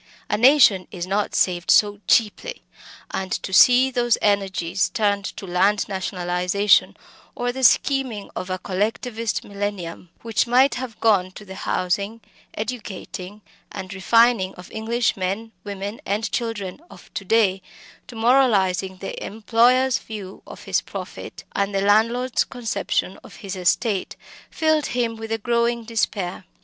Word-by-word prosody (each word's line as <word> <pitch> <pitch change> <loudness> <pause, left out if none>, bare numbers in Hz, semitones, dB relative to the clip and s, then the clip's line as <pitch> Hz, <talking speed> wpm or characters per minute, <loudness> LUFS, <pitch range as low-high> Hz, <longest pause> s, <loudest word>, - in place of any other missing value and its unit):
A - - +3
nation 225 -6 +5
is 180 -5 -5
not 200 +2 -1
saved 180 -1 +1
so 205 -1 +4
cheaply! 240 - +1 0.5
and 190 -1 -4
to 190 - -5
see 255 +5 +6
those 240 -2 +2
energies 195 -3 0
turned 200 -2 0
to - - -7
land 195 +3 +2
nationalisation 185 +1 +1 0.4
or 245 0 -1
the 260 +1 -6
scheming 250 -3 +2
of 185 - -5
a 185 - -1
Collectivist 215 +4 -2
millennium, 200 -4 -5
which 230 +1 0
might 255 +3 +4
have 250 -3 -6
gone 200 -5 +3
to 210 - -11
the 190 - -9
housing, 200 +4 -2 0.4
educating, 210 -3 -6 0.3
and 190 +1 -7
refining 220 0 +3
of 180 - -12
English 230 +2 0
men, 195 +4 -3
women, 200 +1 -6
and 210 +2 -2
children 225 -2 -3
of - - -16
to - - -4
day, 195 -2 +2 0.5
to 250 - -11
moralising 205 -6 +2
the 195 - -6
employer's 240 +4 +2
view 205 -4 -9
of - - -11
his - - 0
profit, - - -8
and 200 0 -1
the 195 - +1
landlord's 230 +5 +2
conception 245 -3 -2
of - - -13
his 195 0 -4
estate 190 +3 0 0.3
filled 315 -1 +1
him 235 -2 -1
with 225 0 -8
a 225 - +1
growing 235 +1 0
despair. 210 -5 -2
210 Hz, 140 wpm, -22 LUFS, 190-235 Hz, 0.5 s, see